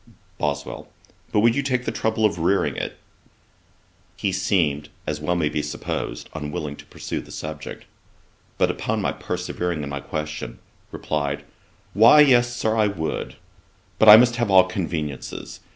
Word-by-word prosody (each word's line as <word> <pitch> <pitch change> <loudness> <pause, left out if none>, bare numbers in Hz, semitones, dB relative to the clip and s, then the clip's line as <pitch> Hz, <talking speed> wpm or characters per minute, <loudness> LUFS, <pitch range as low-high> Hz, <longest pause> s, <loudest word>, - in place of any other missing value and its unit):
BOSWELL. 70 -1 -3 0.4
'But 105 - +3
would 115 +1 +4
you 140 - +1
take 125 -2 -1
the - - -1
trouble 110 -1 0
of 100 -5 +1
rearing 90 +4 +1
it?' - - -4 1.2
He - - 0
seemed, 75 -6 0 0.2
as 75 0 -3
may 75 - -7
well 90 - +2
be 75 - -1
supposed, 75 0 -4
unwilling 75 -1 -4
to - - -13
pursue - - -5
the - - -16
subject: 75 -1 -7 0.7
but - - +3
upon - - -2
my - - 0
persevering 85 -4 -3
in 70 - -5
my 70 0 -4
question, 75 +2 -5 0.3
replied, 70 -2 -2 0.5
'Why 115 +9 +8
yes, 120 -4 +4
Sir, 110 -2 0
I 110 -2 +3
would; 80 -6 -4 0.6
but 110 - +7
I 105 - +13
must 120 0 +4
have 120 -3 0
all 95 -1 +7
conveniencies. 80 -7 -4
90 Hz, 155 wpm, -23 LUFS, 75-110 Hz, 1.2 s, I